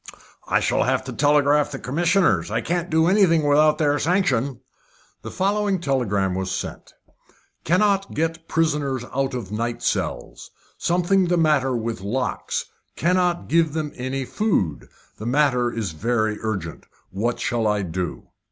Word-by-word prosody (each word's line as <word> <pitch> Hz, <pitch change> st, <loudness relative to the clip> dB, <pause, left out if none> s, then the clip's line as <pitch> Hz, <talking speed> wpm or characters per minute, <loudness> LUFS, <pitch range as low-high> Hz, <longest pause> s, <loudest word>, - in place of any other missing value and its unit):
"I -, -, +2 dB
shall -, -, +1 dB
have -, -, +1 dB
to -, -, -7 dB
telegraph 145 Hz, 0 st, +3 dB
to 140 Hz, -, -6 dB
the -, -, -14 dB
commissioners. 170 Hz, +9 st, +2 dB
I -, -, 0 dB
can't 175 Hz, +1 st, -2 dB
do 160 Hz, 0 st, +3 dB
anything 175 Hz, -4 st, +4 dB
without 150 Hz, +1 st, +4 dB
their 145 Hz, -2 st, +1 dB
sanction." 140 Hz, -8 st, 0 dB, 0.6 s
The -, -, -7 dB
following 200 Hz, 0 st, 0 dB
telegram 105 Hz, -, 0 dB
was 95 Hz, 0 st, -2 dB
sent: 95 Hz, -, -6 dB, 0.7 s
"Cannot 195 Hz, +3 st, +2 dB
get 165 Hz, +1 st, -2 dB
prisoners 145 Hz, -6 st, 0 dB
out 135 Hz, 0 st, -1 dB
of 110 Hz, -6 st, -6 dB
night 115 Hz, +2 st, -3 dB
cells. -, -, -3 dB, 0.3 s
Something 180 Hz, +2 st, +2 dB
the 175 Hz, 0 st, +2 dB
matter 150 Hz, -5 st, +2 dB
with 115 Hz, -2 st, -4 dB
locks. 125 Hz, +6 st, -2 dB, 0.3 s
Cannot 180 Hz, +1 st, +1 dB
give 165 Hz, -2 st, +2 dB
them 155 Hz, -2 st, -3 dB
any 130 Hz, +1 st, -3 dB
food. 125 Hz, -, -1 dB, 0.3 s
The 110 Hz, -, -5 dB
matter 125 Hz, -2 st, +2 dB
is 110 Hz, -6 st, -3 dB
very 110 Hz, +5 st, -1 dB
urgent. 95 Hz, -7 st, -4 dB, 0.2 s
What 115 Hz, +5 st, -2 dB
shall 120 Hz, -4 st, 0 dB
I 105 Hz, -1 st, +1 dB
do?" 90 Hz, 0 st, -4 dB
145 Hz, 150 wpm, -23 LUFS, 115-165 Hz, 0.7 s, anything